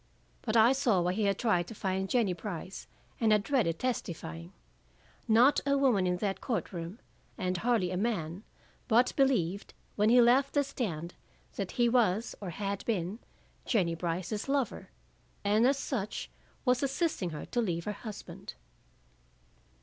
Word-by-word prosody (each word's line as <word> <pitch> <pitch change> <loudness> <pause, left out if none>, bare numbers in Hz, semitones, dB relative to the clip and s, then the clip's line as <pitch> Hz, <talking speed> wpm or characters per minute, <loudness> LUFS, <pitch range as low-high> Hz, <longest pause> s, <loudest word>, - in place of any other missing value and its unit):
But 225 -1 0
I 225 +3 +7
saw 245 -8 +2
why 175 +1 +1
he 210 +2 0
had 200 -1 +1
tried 180 -7 +1
to 225 - -9
find 190 -1 -2
Jennie 225 -7 +2
Brice, 180 +1 -7 0.3
and 225 -2 +3
had 210 -1 +4
dreaded 225 - +1
testifying. 170 -8 -4 0.8
Not 240 +5 +5
a 280 0 +2
woman 240 -9 +3
in 180 0 +1
that 195 +1 -2
court 230 -5 -2
room, 170 +3 -6 0.4
and 185 0 -1
hardly 220 -3 +1
a 180 - -2
man, 185 -5 -2 0.5
but 240 +1 +3
believed 205 - +1 0.2
when 210 +1 +4
he 245 +2 +6
left 250 +4 +4
the 285 - +4
stand, 175 - -4 0.4
that 195 -2 -4
he 240 -1 +3
was, 230 -3 +2
or 195 - -4
had 200 +3 -3
been, 200 -1 -2 0.4
Jennie 185 -8 +1
Brice's 180 +7 -3
lover, 275 -3 -1 0.5
and 210 +4 +4
as 275 +1 +3
such 220 -7 -4 0.3
was 250 -1 +3
assisting 275 - 0
her 155 -2 -6
to 240 - -1
leave 170 -6 -1
her 210 - -1
husband. 210 0 -8
210 Hz, 155 wpm, -30 LUFS, 180-245 Hz, 0.8 s, I